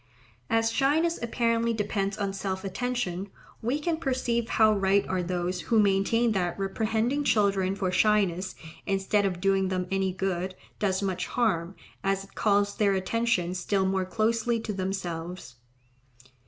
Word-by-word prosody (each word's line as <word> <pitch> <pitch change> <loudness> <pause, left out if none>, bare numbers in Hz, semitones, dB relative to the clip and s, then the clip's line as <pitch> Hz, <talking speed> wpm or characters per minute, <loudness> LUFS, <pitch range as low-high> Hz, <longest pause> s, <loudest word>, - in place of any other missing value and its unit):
As 225 0 +2
shyness 310 +7 +2
apparently 230 0 +1
depends 200 -2 -1
on 200 -2 -2
self 190 -1 -3
attention, 200 -2 -2 0.3
we 250 +6 0
can 325 +1 -1
perceive 250 -6 -1
how 220 -1 +4
right 195 0 +2
are 185 -1 0
those 180 0 -2
who 225 - +4
maintain 210 +4 +3
that 180 -4 -1
reprehending 220 +7 0
children 195 -6 +2
for 190 -2 -1
shyness, 190 -3 +2 0.3
instead 195 +1 +1
of 180 -2 -3
doing 195 0 +2
them 185 -1 -1
any 195 -1 +1
good, 185 0 -2 0.2
does 195 -1 0
much 190 -2 -2
harm, 195 -7 0 0.3
as 195 0 0
it 195 - -17
calls 205 -1 +2
their 200 -2 +2
attention 190 -2 0
still 190 +1 0
more 190 0 0
closely 230 +4 0
to 215 - -4
themselves. 180 -7 -4
195 Hz, 145 wpm, -27 LUFS, 190-225 Hz, 0.3 s, how